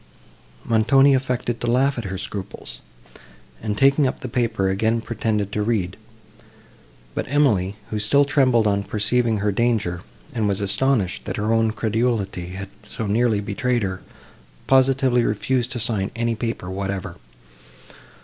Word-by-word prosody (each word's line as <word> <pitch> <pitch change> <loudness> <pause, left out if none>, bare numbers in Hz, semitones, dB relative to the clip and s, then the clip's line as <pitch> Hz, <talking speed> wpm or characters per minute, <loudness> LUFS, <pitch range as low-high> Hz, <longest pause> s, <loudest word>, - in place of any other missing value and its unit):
Montoni 135 +5 +4
affected 125 -2 -1
to 120 - -2
laugh 130 +3 +2
at 120 - -5
her 95 0 -4
scruples, 100 0 -6 0.8
and, 105 -1 -2
taking 140 +2 +4
up 130 - -3
the - - -4
paper, 115 -5 0
again 110 +4 +1
pretended 110 -3 -2
to 105 - -1
read; 105 -4 -1 1.2
but - - -3
Emily, 110 -10 +2 0.2
who 110 - -1
still 140 +7 +4
trembled 130 -5 +3
on 100 -1 +2
perceiving 110 +3 +1
her 105 0 0
danger, 105 -6 0 0.3
and 110 -3 0
was 100 0 +1
astonished, 105 0 0
that - - -4
her 105 +1 0
own 115 0 +3
credulity 110 -4 -1
had 95 +1 -6
so 110 +1 -5
nearly 110 0 +2
betrayed 120 +3 -1
her, 95 -1 -3 0.6
positively 130 -1 +3
refused 125 +3 0
to 120 - -3
sign 105 -4 -1
any 115 0 0
paper 115 -4 -4
whatever. 95 -2 -4
110 Hz, 145 wpm, -22 LUFS, 100-125 Hz, 1.2 s, Montoni